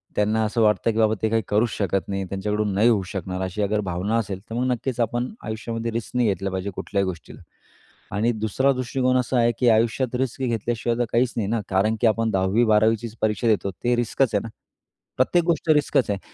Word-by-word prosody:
त्यांना 110 +2 +1
असं 110 +2 0
वाटतं, 110 +1 +3
की 110 - -5
बाबा 110 -1 +3
ते 110 - +1
काही 115 +1 +1
करूच 110 +3 +2
शकत 100 -2 -1
नाही, 100 -1 -2
त्यांच्याकडून 105 +1 -1
नाही 105 +5 +4
होऊ 110 -4 +3
शकणार 95 -1 -4
अशी 95 +3 -3
अगर 105 +1 +1
भावना 95 +5 -1
असेल, 100 -4 -3
तर 115 - -5
मग 125 +2 0
नक्कीच 125 0 -3
आपण 120 +2 -1 0.2
आयुष्यामध्ये 115 +1 -4
रिस्क 115 +2 -5
नाही 125 -2 +3
घेतला 95 0 -2
पाहिजे 95 +1 -3
कुठल्याही 100 -1 -1
गोष्टीला. 90 -3 -7 0.7
आणि 110 +4 +2
दुसरा 110 +5 +1
दृष्टिकोन 130 0 0
असा 125 0 0
आहे, 120 0 +4
की 125 - +4
आयुष्यात 115 +3 +1
रिस्क 130 0 -2
घेतल्याशिवाय 115 0 -1
तर 120 - +2
काहीच 120 +1 +2
नाही 105 - 0
ना 115 0 0
कारण 100 +4 +2
की 120 - +5
आपण 115 +1 +1
10वी 95 +4 +2
12वी 110 +1 +4
चीच 115 0 -8
परीक्षा 110 +2 0
देतो. 105 -3 +1
ते 120 +7 -1
रिस्कच 120 0 0
आहे 100 - +2
ना. 115 - -6 0.7
प्रत्येक 170 +7 +3
गोष्ट 170 -1 0
रिस्कच 145 -5 +3
आहे. 100 - -2
110 Hz, 215 wpm, -23 LUFS, 105-120 Hz, 0.7 s, की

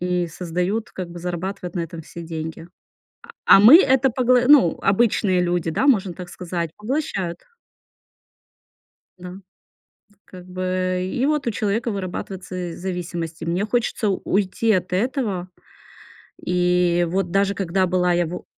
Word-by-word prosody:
И 180 0 0
создают, 180 +5 -3
как 185 -2 -6
бы 175 - -9
зарабатывают 180 +1 -5
на - - 0
этом 165 0 -6
все 170 +2 -10
деньги. 160 0 -6 0.6
А 465 - -13 0.2
а - - +6
мы 235 +10 +10
это 265 -4 +3
погла 250 0 +3
ну, 275 - +6
обычные 195 -3 +2
люди, 175 -2 0
да, 265 - 0
можно 200 -9 +3
так 180 0 -9
сказать, 170 -3 -4
поглощают. 210 - -3 1.8
Да. 180 0 -9 0.8
Тут. 205 -1 -31
Как 180 -1 -13
бы 185 0 -2
и 255 +6 0
вот 300 -2 0
у - - +2
человека 220 +2 -1
вырабатываются 185 -2 -5
зависимости. 175 -3 -5
Мне 175 +4 -1
хочется 235 -1 -1
у 195 - -1
уйти 205 +3 +1
от 185 -2 -1
этого. 200 -4 -1 1.0
И 180 -1 +2
вот 185 -1 -1
даже 200 0 +2
когда 190 0 0
была 180 0 +1
я 175 0 +1
во 175 +2 -7
185 Hz, 145 wpm, -22 LUFS, 175-205 Hz, 1.8 s, мы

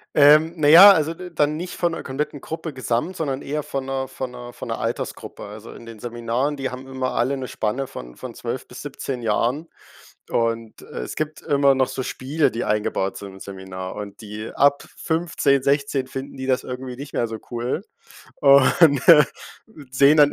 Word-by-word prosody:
Ähm, 155 +3 +6
naja, 165 +7 +10
also 160 -4 +2
d 180 +2 -9
dann 150 0 +2
nicht 175 +3 -5
von 175 -1 0
'ner - - -5
kompletten 140 +1 -4
Gruppe 160 -1 -6
gesamt, 130 +7 -2
sondern 140 -5 -3
eher 150 +2 -2
von 135 -1 -4
'ner 135 0 -2
von 130 -1 -6
'ner 120 -1 -9
von - - -8
'ner - - -3
Altersgruppe. - - -4
Also 105 +2 -10
in - - -12
den 115 -2 -11
Seminaren, 120 +5 -2
die 135 -2 -3
haben 130 +1 -8
immer 130 -1 -3
alle 135 +3 0
'ne 130 - -5
Spanne 110 +5 -2
von - - -10
von - - -8
12 - - -5
bis - - -10
17 130 -3 -5
Jahren 120 +8 0 0.6
und, 115 -1 -1
äh, - - -8
es - - -6
gibt 155 0 -4
immer 140 -1 +3
noch 130 -1 +2
so 130 - -4
Spiele, 140 +4 0
die 115 - -3
eingebaut 105 -2 -1
sind 100 -1 -9
im 95 - -13
Seminar 95 -1 -7
und 105 +1 -8
die 110 +1 -7
ab 140 0 +3
15, 160 -4 +1
16 140 -1 +1
finden 135 +1 -7
die 130 - -5
das 130 0 +1
irgendwie 125 0 -6
nicht 140 +2 -9
mehr 120 - 0
so 110 -1 -6
cool 120 +1 -2 0.5
und 140 +1 +5 0.9
sehen 140 +4 +5
dann 145 -1 +6
130 Hz, 190 wpm, -22 LUFS, 115-145 Hz, 0.9 s, naja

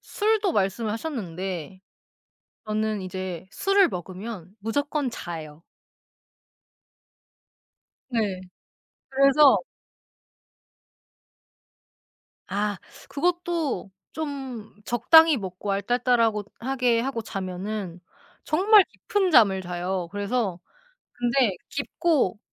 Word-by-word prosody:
술도 420 -3 0
말씀을 205 +1 0
하셨는데 190 - -5 0.9
저는 215 -1 -1
이제 185 -1 -5
술을 390 - +3
먹으면 185 +1 -7
무조건 285 +5 -1
자요. 160 -6 -8 2.5
네. 210 -6 -1 0.7
그래서 275 +1 +6 2.9
아 205 +1 -1 0.3
그것도 335 - -1 0.2
좀 270 -8 -6
적당히 320 +7 +6
먹고 190 0 -5
알딸딸하고 230 +1 +1 0.2
하게 250 -2 +1
하고 255 -2 -2
자면은 190 -2 -5 0.4
정말 400 +5 +6
깊은 405 -6 -1
잠을 195 -8 +5
자요. 180 0 -3
그래서 205 -3 -1 0.5
근데 240 -4 +1
깊고 295 - 0
220 Hz, 170 characters per minute, -25 LUFS, 190-275 Hz, 2.9 s, 그래서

